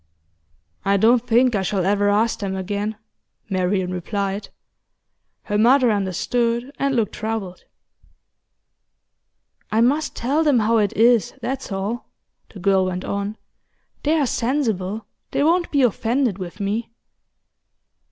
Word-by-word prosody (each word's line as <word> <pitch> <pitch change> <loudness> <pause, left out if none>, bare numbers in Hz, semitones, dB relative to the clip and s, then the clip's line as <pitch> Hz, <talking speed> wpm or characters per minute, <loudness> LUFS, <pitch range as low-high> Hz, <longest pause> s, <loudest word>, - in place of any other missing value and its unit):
'I 200 0 +2
don't 230 +4 +3
think 245 +2 +4
I 200 - +1
shall 190 -1 -1
ever 205 +1 +2
ask 215 +3 +1
them 195 -2 -3
again,' 205 +3 -3 0.6
Marian 185 0 0
replied. 200 +2 -3 0.9
Her 210 -1 -1
mother 250 +2 +5
understood, 235 +6 -1
and 275 -1 +1
looked 225 -4 0
troubled. 215 -4 -4 2.1
'I 220 - +3
must 285 +6 +1
tell 280 +7 +1
them 290 -5 +3
how 225 +1 +3
it 205 -2 +1
is, 235 0 +4
that's 260 -1 -4
all,' 200 +5 -3 0.4
the - - -13
girl 190 0 +3
went 185 0 -3
on. 200 +2 -3 0.6
'They 305 +2 +2
are - - +3
sensible; 225 -6 -1 0.2
they - - 0
won't 345 +3 +2
be 280 -2 +2
offended 235 -1 +1
with 185 +2 -7
me. 210 +4 -2
215 Hz, 130 wpm, -22 LUFS, 195-245 Hz, 2.1 s, mother